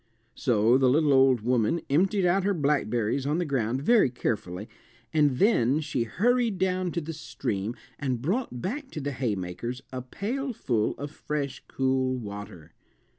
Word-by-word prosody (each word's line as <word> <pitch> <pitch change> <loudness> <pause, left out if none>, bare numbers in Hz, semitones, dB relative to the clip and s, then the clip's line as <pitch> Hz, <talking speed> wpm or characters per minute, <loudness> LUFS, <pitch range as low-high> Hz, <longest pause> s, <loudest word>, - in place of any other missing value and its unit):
So 115 +1 +3
the 130 -2 +4
little 145 +2 +4
old 130 -3 +5
woman 125 +6 +1
emptied 185 +6 +2
out 180 +2 +3
her 200 0 +1
blackberries 135 -4 0
on 150 +3 +1
the 175 - 0
ground 130 -2 -1
very 225 - +5
carefully 105 -5 -3 0.5
and 145 -4 +3
then 145 - +3
she 145 -6 -1
hurried 230 - +1
down 185 -1 0
to 170 - -1
the 165 +1 -5
stream 115 -6 -3 0.2
and 130 -4 -1
brought 165 - -2
back 265 +8 -3
to - - -4
the 145 0 -3
haymakers 115 0 -3
a 130 - -3
pailful 200 - -2
of 145 +1 -6
fresh 145 -3 -4
cool 130 -1 0
water. 100 -7 -8
135 Hz, 155 wpm, -27 LUFS, 120-175 Hz, 0.5 s, old